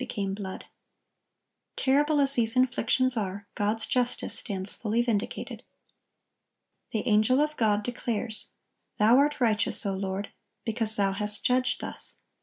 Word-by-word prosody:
became 200 Hz, -6 st, -4 dB
blood." 195 Hz, -1 st, -7 dB, 1.1 s
Terrible 290 Hz, +3 st, +1 dB
as 275 Hz, -1 st, +3 dB
these 230 Hz, -3 st, +3 dB
inflictions 255 Hz, 0 st, +2 dB
are, 200 Hz, -2 st, -4 dB
God's 210 Hz, +2 st, -2 dB
justice 250 Hz, -1 st, -1 dB
stands 195 Hz, -2 st, -4 dB
fully 230 Hz, +2 st, -1 dB
vindicated. 220 Hz, -4 st, -4 dB, 1.3 s
The 215 Hz, -, -4 dB
angel 215 Hz, +4 st, +3 dB
of 300 Hz, +1 st, -1 dB
God 210 Hz, -4 st, 0 dB
declares: 230 Hz, -2 st, -4 dB, 0.5 s
"Thou 220 Hz, +4 st, +4 dB
are 290 Hz, +2 st, +3 dB
righteous, 220 Hz, -2 st, +3 dB
O 195 Hz, -, -1 dB
Lord,... 190 Hz, +1 st, -5 dB, 0.3 s
because 225 Hz, -1 st, +6 dB
Thou 200 Hz, -2 st, +1 dB
hast 210 Hz, +1 st, +2 dB
judged 255 Hz, 0 st, 0 dB
thus. -, -, -4 dB
220 Hz, 130 wpm, -26 LUFS, 205-250 Hz, 1.3 s, because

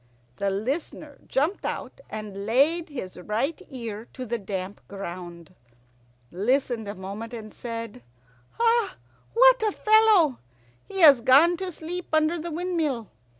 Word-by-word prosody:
The 200 Hz, -, 0 dB
Listener 275 Hz, -, -4 dB
jumped 310 Hz, +9 st, 0 dB
out -, -, -5 dB
and 205 Hz, -2 st, -6 dB
laid 310 Hz, +9 st, +3 dB
his 245 Hz, -11 st, -7 dB
right 230 Hz, -, -2 dB
ear 230 Hz, -4 st, -6 dB
to 255 Hz, -, -6 dB
the 235 Hz, 0 st, -2 dB
damp 195 Hz, -1 st, -5 dB
ground, 175 Hz, -4 st, -8 dB, 0.8 s
listened 235 Hz, +3 st, 0 dB
a 205 Hz, -, -5 dB
moment, 205 Hz, +5 st, -7 dB
and 215 Hz, -2 st, -9 dB
said, 230 Hz, -, -6 dB, 0.5 s
"What 470 Hz, +2 st, +2 dB
a 430 Hz, -1 st, +2 dB
fellow! 425 Hz, -, +4 dB, 0.5 s
He 385 Hz, -1 st, -4 dB
has 285 Hz, -7 st, +8 dB
gone 285 Hz, +9 st, +6 dB
to 375 Hz, 0 st, -4 dB
sleep 345 Hz, +2 st, -6 dB
under 315 Hz, +2 st, +2 dB
the 340 Hz, +2 st, -5 dB
windmill. 320 Hz, -, -2 dB
260 Hz, 130 wpm, -26 LUFS, 210-340 Hz, 0.8 s, has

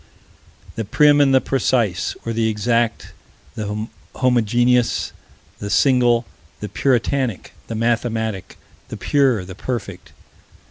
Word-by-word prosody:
The 115 Hz, -, -1 dB
prim 145 Hz, +7 st, +4 dB
and 140 Hz, -1 st, +4 dB
the 135 Hz, -, +5 dB
precise, 115 Hz, -8 st, 0 dB
or 115 Hz, -, -2 dB
the 110 Hz, 0 st, +1 dB
exact, 115 Hz, +2 st, -1 dB, 0.4 s
the 105 Hz, 0 st, -4 dB, 0.3 s
homogeneous, 120 Hz, 0 st, +2 dB, 0.5 s
the 100 Hz, -, -5 dB
single, 120 Hz, -1 st, +3 dB, 0.3 s
the 105 Hz, -, -5 dB
puritanic, 125 Hz, 0 st, 0 dB, 0.2 s
the 115 Hz, -, -5 dB
mathematic, 110 Hz, -4 st, -2 dB, 0.3 s
the -, -, -7 dB
pure, 130 Hz, -9 st, +1 dB
the 95 Hz, -, -9 dB
perfect. 120 Hz, +3 st, -6 dB
115 Hz, 110 wpm, -20 LUFS, 110-125 Hz, 0.5 s, the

